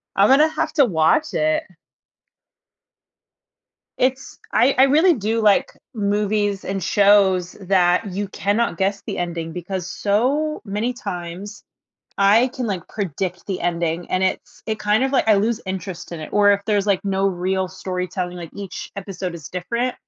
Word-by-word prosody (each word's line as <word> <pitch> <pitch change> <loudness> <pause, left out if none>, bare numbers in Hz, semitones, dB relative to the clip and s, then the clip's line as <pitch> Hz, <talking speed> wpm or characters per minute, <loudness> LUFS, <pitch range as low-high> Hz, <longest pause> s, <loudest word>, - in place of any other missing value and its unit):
I'm 200 +2 +4
gonna 285 +4 +6
have 315 - -2
to 290 -4 +5
watch 195 - +2
it. 310 +1 +1 2.3
It's 260 +1 -1
I 270 +3 +4
I 260 - +7
really 310 +7 +5
do, 225 -2 -1
like, 210 -2 +3 0.2
movies 205 -1 0
and 195 0 -3
shows 195 -2 +3
that 185 0 +2
you 200 +2 -3
cannot 205 -1 0
guess 195 +2 -1
the - - -4
ending, 170 -2 -3
because 180 +1 -5
so 265 +12 0
many 210 +5 -2
times 185 -3 -7 0.6
I 210 +5 +5
can, 255 -1 -4
like, 190 -5 -3
predict 185 -2 -4
the 190 -2 -3
ending, 170 0 -1
and 185 - +1
it's 190 - -3
it 220 -1 -3
kinda, 215 +6 +2
like 265 -4 +1
I 215 - +7
lose 220 +3 +1
interest 185 -2 -6
in 165 - -6
it, 155 - -8
or 205 -1 +5
if 200 0 0
there's, 205 -2 +1
like, 200 -3 +2
no 195 0 +1
real 190 0 -1
storytelling, 180 -1 -4
like, 170 -2 -8
each 200 -2 -7
episode 185 -2 -5
is 160 -3 -9
different 235 +8 -2
200 Hz, 160 wpm, -21 LUFS, 180-225 Hz, 2.3 s, I